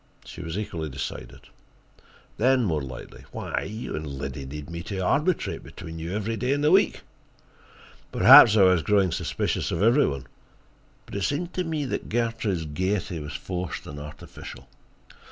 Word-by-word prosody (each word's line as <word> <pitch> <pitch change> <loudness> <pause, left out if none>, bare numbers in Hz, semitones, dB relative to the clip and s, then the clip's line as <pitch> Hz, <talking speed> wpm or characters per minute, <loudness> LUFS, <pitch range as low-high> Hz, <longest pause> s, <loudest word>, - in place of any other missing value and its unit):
She - - -9
was 85 +1 -5
equally 85 -7 -4
decided. 70 0 -6 1.0
Then, 130 +2 +3
more 80 -8 0
lightly: 65 -1 -9
"Why, - - -3
you 110 +4 -5
and 75 0 -4
Liddy 70 -1 -5
need 75 +1 -7
me 85 0 -6
to 100 +3 -5
arbitrate 145 - 0
between 80 -1 -9
you 85 +4 -4
every 110 +2 -2
day 125 +4 0
in 145 - -1
the 150 +1 +3
week." 190 +2 +4 1.1
Perhaps 110 -1 +9
I 100 - +7
was 90 -2 +5
growing 95 +1 +2
suspicious - - -1
of 85 - -1
every 120 +7 +5
one, 70 -2 -4 0.8
but - - -13
it 100 - -2
seemed 170 - -1
to 185 - -1
me 160 -4 -2
that 130 - -4
Gertrude's 115 -7 -1
gaiety 90 +3 -2
was 75 0 -7
forced 90 +5 -4
and 75 0 -8
artificial. 75 0 -10
95 Hz, 165 wpm, -26 LUFS, 80-115 Hz, 1.1 s, Perhaps